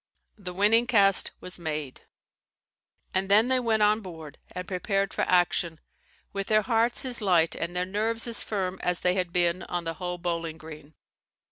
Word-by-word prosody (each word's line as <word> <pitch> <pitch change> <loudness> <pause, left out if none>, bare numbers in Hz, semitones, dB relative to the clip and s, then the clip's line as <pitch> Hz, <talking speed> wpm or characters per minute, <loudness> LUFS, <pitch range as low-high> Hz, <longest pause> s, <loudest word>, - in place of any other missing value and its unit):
The 180 -3 -7
winning 220 +5 +3
cast 200 -5 +4
was 180 0 -4
made; 155 -5 -5 1.1
and 190 +1 0
then 215 +5 +5
they 260 0 +3
went 225 -3 +1
on 210 +1 +3
board 160 -6 -10
and 180 0 -6
prepared 195 +1 -1
for - - -2
action, 175 -2 +1 0.5
with 195 -1 -3
their 215 -1 +3
hearts 235 +2 +1
as 245 -3 +3
light 175 -5 +3
and 170 +1 -5
their 180 0 0
nerves 220 +4 -1
as 235 -1 +1
firm 190 -3 -3
as 180 0 +1
they 180 - +2
had 180 -2 -2
been 175 0 +1
on 175 -1 -4
the 165 0 -3
Hoe 180 +1 -5
Bowling 170 -2 -3
Green. 155 -1 -12
185 Hz, 175 wpm, -27 LUFS, 170-210 Hz, 1.1 s, then